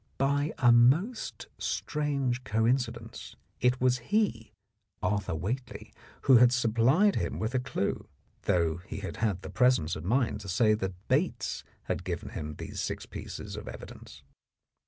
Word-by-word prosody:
By 145 +2 +1
a 120 -3 +5
most 145 - +3
strange 140 -5 -1
coin 110 +4 +2
cidence 115 -2 -7 0.2
it 125 +1 +2
was 125 0 +2
he, 205 - +1 0.5
Arthur 100 -2 0
Whately, 115 - -4 0.3
who 130 -2 +7
had 120 +1 +6
supplied 125 - +3
him - - -2
with 110 +3 -2
a 130 - +2
clue, 125 -6 -2 0.4
though 85 -2 +2
he 95 +3 -8
had 95 - -6
had 100 -5 -1
the - - -7
presence 125 - +3
of 80 - -7
mind 115 +1 +1
to 100 - -8
say 110 +4 +4
that 95 -2 -4
Bates 150 +8 0 0.2
had - - -3
given 90 -2 -4
him 75 0 -6
these - - -7
six - - -3
pieces - - -7
of - - -8
evidence. - - -10
120 Hz, 155 wpm, -29 LUFS, 100-130 Hz, 0.5 s, who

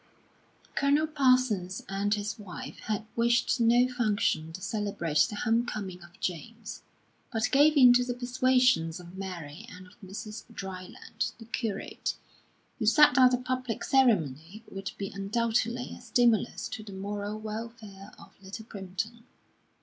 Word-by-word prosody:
V - - -27
Colonel 285 +2 +3
Parsons 255 - +2
and 200 +2 0
his 210 +2 -4
wife 195 -4 -8
had 215 0 -2
wished 235 +1 +2
no 240 +2 +5
function 210 -10 0
to 170 - -7
celebrate 190 -6 0
the 210 - -5
home 230 +2 +2
coming 195 -6 -5
of 175 0 -16
James; 220 +6 -5 0.5
but 225 -2 0
gave 295 +2 +5
in 250 -3 +9
to 250 0 +4
the 245 0 -3
persuasions 250 -8 +2
of 175 +1 -12
Mary 180 -3 -7
and 185 +1 -11
of 180 - -18
Mr. 210 +3 -7
Dryland, 190 +3 -5
the 225 - -11
curate, 220 -3 -3 0.6
who 220 - -1
said 295 +5 +7
that 255 -1 +6
a - - -1
public 255 -2 -3
ceremony 200 - +2
would 195 +1 -5
be 195 -1 -3
undoubtedly 230 +4 -1
a - - -13
stimulus 235 -3 +2
to - - -5
the 210 -2 -10
moral 205 +2 -4
welfare 215 -2 -7
of - - -15
Little 200 +3 -8
Primpton. 215 +3 -5
215 Hz, 150 wpm, -29 LUFS, 195-245 Hz, 0.6 s, in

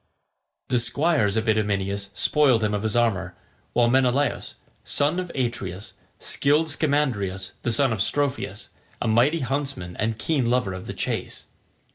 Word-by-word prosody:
The 125 -2 +2
squires 120 -3 +1
of 110 +1 -1
Idomeneus 100 -2 0
spoiled 135 -7 +3
him 105 0 +1
of 105 - -1
his 110 0 -1
armour, 95 -7 +1 0.4
while 120 -1 +4
Menelaus, 130 +3 +1 0.3
son 150 +5 +1
of 180 -1 -4
Atreus, 110 -7 -3 0.5
killed 150 +3 +3
Scamandrius 120 - 0
the 120 - -1
son 125 +1 +2
of 105 - -2
Strophius, 145 +5 -1 0.3
a - - -2
mighty 125 +9 +3
huntsman 135 -9 -3
and 110 +1 -1
keen 130 -1 0
lover 120 -6 +1
of 95 0 -7
the - - -5
chase. - - -3
120 Hz, 145 wpm, -24 LUFS, 105-140 Hz, 0.5 s, while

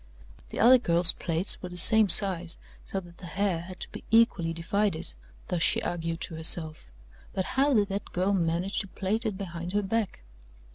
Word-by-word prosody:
The - - -8
other 250 +3 +5
girl's 170 -4 +3
plaits 165 +3 -1
were 180 - -8
the 180 - -9
same 220 +3 +6
size, 180 -3 +5 0.3
so 195 - -4
that 175 -1 -18
the 180 - -11
hair 190 -1 -3
had 180 +1 -12
to - - -6
be - - -11
equally 225 -7 +1
divided 165 - -2 0.4
thus 175 -2 -3
she - - +2
argued 165 -1 -5
to - - -6
herself 160 -1 +3 0.5
but 190 - -3
how 275 +1 +1
did 205 -2 0
that 200 +1 -7
girl 185 +3 -2
manage 175 +1 -2
to 200 - -4
plait 210 +5 -3
it 205 -3 -5
behind 175 -2 -8
her 205 0 -1
back? 205 - -4
185 Hz, 190 wpm, -26 LUFS, 170-205 Hz, 0.5 s, same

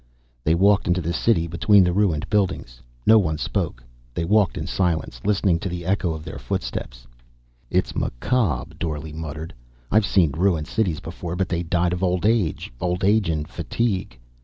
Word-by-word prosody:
They 80 +4 +3
walked 100 +3 +4
into 90 +1 +2
the 85 +2 -1
city 100 -6 +2
between 95 +4 +4
the 90 -1 +1
ruined 90 -6 +1
buildings. 95 - -1 0.2
No 110 0 +7
one 80 -6 0
spoke. - - -2 0.3
They 85 - -1
walked 100 0 +3
in - - -3
silence, 80 -9 -1
listening 100 -4 +2
to 95 - -3
the 85 -1 -5
echo 95 -2 +1
of 80 0 -9
their - - -7
footsteps. - - -4 0.6
"It's - - 0
macabre," 80 - -1
Dorle 75 -1 -4
muttered. 80 0 -6 0.4
"I've 105 -1 +4
seen 85 -7 +3
ruined 85 0 +1
cities 95 -7 -1
before 85 +1 -6
but 95 0 -1
they 85 -1 -1
died 85 +1 0
of 90 - -3
old 90 0 +1
age, 105 - +1
old 90 +2 -1
age 105 -1 +3
and 75 -2 -1
fatigue. 100 - -2
90 Hz, 175 wpm, -23 LUFS, 80-100 Hz, 0.6 s, No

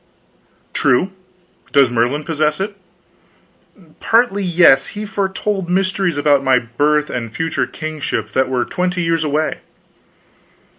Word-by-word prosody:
"True. 135 +10 +2 0.6
Does 135 -4 +5
Merlin 120 +6 0
possess 155 0 0
it?" 200 +1 -3 1.2
"Partly, 225 -3 +2
yes. 170 -7 +4
He 210 - -4
foretold 195 -2 -2
mysteries 185 -2 0
about 145 -1 +3
my 130 -1 +4
birth 145 +6 0
and 115 -3 -4
future 165 +5 -2
kingship 150 -8 -4
that 130 +2 +1
were 125 -2 0
twenty 180 -1 -2
years 165 -1 +1
away." 155 +1 -1
155 Hz, 115 wpm, -18 LUFS, 135-185 Hz, 1.2 s, Does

